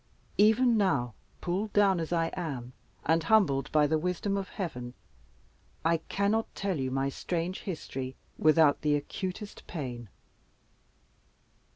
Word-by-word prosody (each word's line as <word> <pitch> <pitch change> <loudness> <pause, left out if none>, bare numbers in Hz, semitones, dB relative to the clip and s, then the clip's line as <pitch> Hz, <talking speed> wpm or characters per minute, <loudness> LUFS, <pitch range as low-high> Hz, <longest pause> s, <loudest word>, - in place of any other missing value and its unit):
Even 225 +3 +5
now, 140 - +1 0.3
pulled 195 +4 -2
down 200 -3 +4
as 165 0 -3
I 165 -1 +1
am, 135 -9 -4 0.3
and 165 +1 +3
humbled 160 -7 +3
by 150 -1 +5
the 155 +2 +2
wisdom 180 +4 -1
of 195 -2 -3
Heaven, 125 - -5 0.9
I 165 0 +4
cannot 200 +6 -1
tell 195 -6 -1
you 130 -1 -1
my 135 +1 0
strange 175 +5 -3
history 135 -7 -5 0.2
without 155 -2 +4
the 150 -1 +2
acutest 185 +7 -5
pain." 120 - -5
165 Hz, 130 wpm, -30 LUFS, 140-195 Hz, 0.9 s, Even